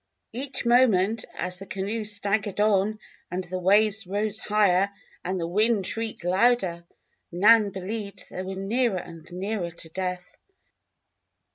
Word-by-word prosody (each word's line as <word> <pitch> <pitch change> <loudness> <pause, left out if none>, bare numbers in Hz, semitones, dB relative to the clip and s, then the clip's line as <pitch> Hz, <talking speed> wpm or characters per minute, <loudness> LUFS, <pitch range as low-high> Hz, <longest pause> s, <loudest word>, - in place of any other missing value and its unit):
Each 265 +2 -2
moment, 225 -3 +3
as 180 0 -4
the 195 - -9
canoe 205 +4 -3
staggered 205 -1 -1
on 210 0 +2 0.3
and 180 +2 -3
the 185 +1 -4
waves 205 +2 +3
rose 210 +2 -1
higher 200 -3 +3 0.3
and 185 +1 -2
the 165 - -1
wind 210 +3 +2
shrieked 225 0 -3
louder, 185 -2 +2 0.5
Nan 210 +4 +5
believed 200 +2 -5
that - - -9
they - - -2
were 190 +1 -5
nearer 210 +2 0
and 165 -1 -9
nearer 190 0 -3
to 165 -1 -10
death. 180 +1 -5
200 Hz, 140 wpm, -26 LUFS, 185-215 Hz, 0.5 s, Nan